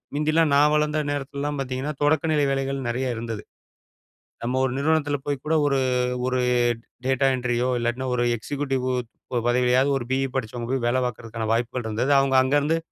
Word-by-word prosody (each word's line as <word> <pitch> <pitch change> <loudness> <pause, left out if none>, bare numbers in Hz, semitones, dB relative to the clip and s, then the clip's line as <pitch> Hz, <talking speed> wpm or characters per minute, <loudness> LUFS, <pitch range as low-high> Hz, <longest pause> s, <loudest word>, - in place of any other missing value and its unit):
முந்தி 150 +1 +1
எல்லாம் 160 -2 +3
நான் 145 +1 +5
வளர்ந்த 150 0 +1
நேரத்தில 140 -1 -4
எல்லாம் 145 0 -2
பார்த்தீங்கன்னா, 130 +2 -3
தொடக்க 145 0 +3
நிலை 150 -1 +2
வேலைகள் 135 0 -1
நெறைய 125 +1 -1
இருந்தது. 115 -2 -5 1.0
நம்ம 125 +2 -1
ஒரு 130 - -1
நிறுவனத்தில 145 0 +1
போய் 145 -1 -1
கூட 155 - 0
ஒரு 140 -1 +2 0.5
ஒரு 130 0 0 0.7
டேட்டா 135 +1 +2
என்ட்ரி 125 -1 -1
யோ 125 - +1
இல்லாட்டின்னா 120 +2 -2
ஒரு 120 - +1
எக்ஸிக்யூட்டிவ் 135 +2 -2 0.6
பதவியாவது, 125 +2 +3
ஒரு 120 - -5
பியி 135 +1 +1
படிச்சவங்க 120 -1 -3
போய் 130 -3 0
வேல 120 +2 +2
பார்ப்பதற்கான 115 -2 -4
வாய்ப்புகள் 120 +1 -2
இருந்தது. 115 +6 0
அவங்க 135 -1 +2
அங்க 130 +3 +1
இருந்து 155 +3 +1
130 Hz, 170 wpm, -24 LUFS, 120-145 Hz, 1.0 s, நான்